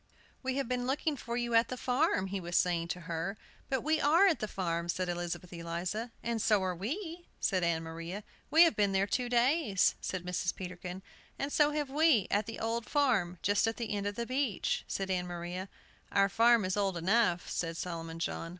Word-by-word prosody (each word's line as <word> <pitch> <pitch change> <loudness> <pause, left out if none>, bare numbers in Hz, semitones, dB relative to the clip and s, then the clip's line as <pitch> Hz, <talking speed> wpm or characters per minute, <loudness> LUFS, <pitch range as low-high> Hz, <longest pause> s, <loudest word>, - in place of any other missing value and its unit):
"We 260 -1 -2
have 275 -3 -1
been 250 0 -1
looking 290 +3 0
for 235 -2 -4
you 240 -1 -1
at 230 0 +5
the 255 - -5
farm," 245 -6 +1
he 195 +1 -3
was 175 -1 -1
saying 170 -2 +2
to 180 +1 -4
her. 170 +4 -3 0.3
"But 265 -2 0
we 310 +1 +2
are 325 +7 +5
at 360 -6 +3
the 215 - -2
farm," 170 -3 -2
said 185 +1 -1
Elizabeth 175 0 -4
Eliza. 175 +7 -3
"And 230 -1 -1
so 210 -3 +3
are 185 -1 0
we!" 330 - -5
said 185 -3 +1
Ann 165 -1 +1
Maria. 165 +5 -6 0.3
"We 320 +3 +8
have 335 - +4
been 200 -2 +2
there 195 +1 +3
two 245 +4 -1
days," 240 - +3
said 185 -2 -4
Mrs. 180 -1 -1
Peterkin. 180 0 -7 0.3
"And 280 +1 -3
so 295 -1 +5
have 295 -3 -2
we, 295 - +4
at 205 +2 +1
the 225 - -5
'Old 230 0 -2
Farm,' 225 - +2
just 205 +2 +3
at 225 - -1
the 225 -3 -3
end 200 0 -1
of 205 - -3
the 235 - -2
beach," 255 -5 -1
said 195 -1 -2
Ann 180 -1 -1
Maria. 175 +2 -5 0.4
"Our 195 0 +4
farm 230 0 +5
is 185 - 0
old 195 -3 0
enough," 180 0 +2
said 165 -1 -3
Solomon 165 -2 -5
John. 165 0 -3
200 Hz, 210 wpm, -32 LUFS, 180-245 Hz, 0.4 s, We